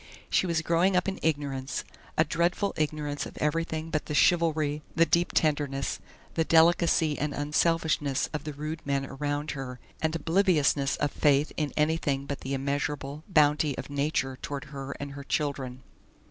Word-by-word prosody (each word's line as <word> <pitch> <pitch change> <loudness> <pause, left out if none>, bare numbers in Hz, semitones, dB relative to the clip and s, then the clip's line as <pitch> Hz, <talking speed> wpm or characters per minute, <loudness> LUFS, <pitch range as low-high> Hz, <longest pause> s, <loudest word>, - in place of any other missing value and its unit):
She 185 - +3
was 165 -2 0
growing 170 +4 +3
up 180 - +2
in 190 - -2
ignorance, 140 -3 -1 0.3
a 160 - +6
dreadful 170 +5 0
ignorance 150 -1 -2
of - - -12
everything 160 +1 -1
but 155 -3 -1
the 150 - -2
chivalry, 155 -3 +3
the 165 +1 +5
deep 170 +1 +2
tenderness, 145 -3 0 0.3
the 165 - +2
delicacy 165 -1 +4
and 150 -1 -1
unselfishness 150 -1 +1
of 150 -2 -3
the 150 - -5
rude 155 +3 -5
men 140 -1 0
around 145 +2 -3
her, 130 -2 -6 0.2
and 160 0 0
obliviousness 160 -5 +2
of 145 -1 -1
faith 145 0 +3
in 150 -2 -1
anything 150 -3 +1
but 140 0 -5
the 135 +1 -2
immeasurable 140 +1 -2
bounty 150 -4 +3
of - - -6
Nature 140 -2 -1
toward 140 -3 -4
her 135 0 -5
and 140 0 -5
her 140 0 -8
children. 135 -3 -2
150 Hz, 160 wpm, -28 LUFS, 140-160 Hz, 0.3 s, a